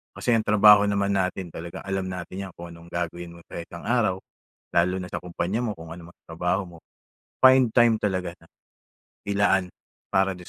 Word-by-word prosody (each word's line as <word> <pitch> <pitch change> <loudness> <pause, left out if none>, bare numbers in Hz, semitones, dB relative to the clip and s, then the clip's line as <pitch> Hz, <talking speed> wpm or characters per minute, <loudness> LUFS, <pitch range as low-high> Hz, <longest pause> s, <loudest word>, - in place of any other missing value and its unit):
Kasi 125 - -1
ang 115 -2 +3
trabaho 105 0 +7
naman 100 -1 0
natin 95 -2 -1
talagang 85 +1 -8
alam 95 0 -3
natin 90 -1 -6
niya 95 -2 -7
kung 85 0 -9
anong 85 0 -13
gagawin 85 0 -5
mo 85 - -15
sa - - -8
isang 85 0 -9
araw 115 -6 +1 0.6
lalo 90 +2 +2
na 90 -1 -7
sa - - -3
kumpanya 90 +4 -3
mo 115 -4 -2
kung 80 0 -11
ano 85 0 -10
man - - -34
ang - - -70
trabaho 90 +4 0
mo 85 -1 -13 0.7
find 130 -1 +7
time 120 -2 +5
talaga 95 -3 -1
na 80 - -20 0.8
ilaan 100 -2 +2 0.4
para 95 0 +3
dun 90 -1 -13
95 Hz, 195 wpm, -25 LUFS, 85-100 Hz, 0.8 s, trabaho